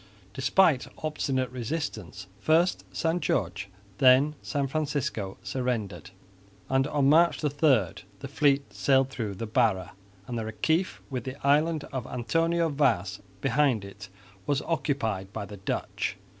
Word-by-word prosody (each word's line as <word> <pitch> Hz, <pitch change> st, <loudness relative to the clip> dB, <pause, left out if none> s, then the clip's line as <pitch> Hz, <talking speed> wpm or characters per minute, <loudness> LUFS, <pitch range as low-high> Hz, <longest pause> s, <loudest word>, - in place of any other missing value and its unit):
Despite 135 Hz, -, +3 dB, 0.2 s
obstinate 135 Hz, -4 st, -1 dB
resistance, 115 Hz, -, -4 dB
first 165 Hz, -, +2 dB
San 165 Hz, +2 st, 0 dB
Jorge, 100 Hz, -, -1 dB, 0.3 s
then 135 Hz, +3 st, +6 dB
San 140 Hz, -2 st, -1 dB
Francisco 140 Hz, -8 st, -2 dB
surrendered; 115 Hz, -, -3 dB, 0.6 s
and 135 Hz, +1 st, +2 dB
on 145 Hz, -2 st, +1 dB
March 165 Hz, +4 st, +4 dB
3 150 Hz, -, +1 dB
the 110 Hz, -, 0 dB
fleet 140 Hz, -5 st, +1 dB
sailed 135 Hz, +7 st, +2 dB
through 110 Hz, -6 st, -4 dB
the 115 Hz, -, -4 dB
Barra, 110 Hz, -6 st, +1 dB, 0.3 s
and 120 Hz, -2 st, -4 dB
the -, -, -3 dB
Reciff 160 Hz, -, 0 dB
with 125 Hz, -3 st, -3 dB
the 130 Hz, 0 st, -5 dB
island 150 Hz, +2 st, +3 dB
of 130 Hz, -2 st, -3 dB
Antonio 165 Hz, +7 st, +1 dB
Vaz 115 Hz, -, +1 dB, 0.2 s
behind 130 Hz, -5 st, +2 dB
it 100 Hz, +1 st, -11 dB, 0.4 s
was 140 Hz, -2 st, +1 dB
occupied 135 Hz, -, -1 dB
by 105 Hz, -1 st, -5 dB
the 105 Hz, 0 st, -10 dB
Dutch. 95 Hz, -, -3 dB
130 Hz, 130 wpm, -27 LUFS, 110-150 Hz, 0.6 s, then